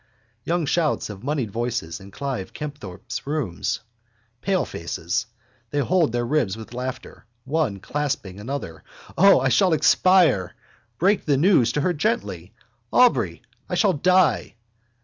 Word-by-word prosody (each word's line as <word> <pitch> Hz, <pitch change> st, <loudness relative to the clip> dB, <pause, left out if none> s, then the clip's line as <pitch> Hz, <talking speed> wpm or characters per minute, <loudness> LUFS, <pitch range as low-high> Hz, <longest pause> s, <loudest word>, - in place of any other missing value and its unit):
Young 170 Hz, -1 st, 0 dB
shouts 155 Hz, -6 st, 0 dB
of 100 Hz, +1 st, -11 dB
moneyed 135 Hz, -6 st, -2 dB
voices 120 Hz, -7 st, -3 dB
in 95 Hz, 0 st, -12 dB
Clive 130 Hz, -3 st, -5 dB
Kempthorpe's 140 Hz, -9 st, -7 dB
rooms. 140 Hz, -, -2 dB, 0.6 s
Palefaces: 115 Hz, -, -2 dB, 0.4 s
they 145 Hz, -, -4 dB
hold 165 Hz, 0 st, +2 dB
their 120 Hz, 0 st, -1 dB
ribs 120 Hz, -7 st, 0 dB
with 110 Hz, +1 st, -10 dB
laughter, 125 Hz, -1 st, -6 dB, 0.2 s
one 135 Hz, -8 st, -1 dB
clasping 130 Hz, -7 st, -3 dB
another. 120 Hz, -, -6 dB, 0.3 s
O, 195 Hz, +3 st, +6 dB
I 135 Hz, -, +2 dB
shall 185 Hz, +5 st, +3 dB
expire! 160 Hz, -, +4 dB, 0.4 s
Break 195 Hz, -, +2 dB
the 145 Hz, -3 st, +2 dB
news 150 Hz, -, +4 dB
to 150 Hz, -, 0 dB
her 175 Hz, +4 st, +1 dB
gently, 215 Hz, +9 st, -2 dB, 0.4 s
Aubrey! 250 Hz, -1 st, +3 dB, 0.3 s
I -, -, -1 dB
shall 200 Hz, -5 st, +3 dB
die! 175 Hz, -, +2 dB
140 Hz, 130 wpm, -23 LUFS, 110-170 Hz, 0.6 s, O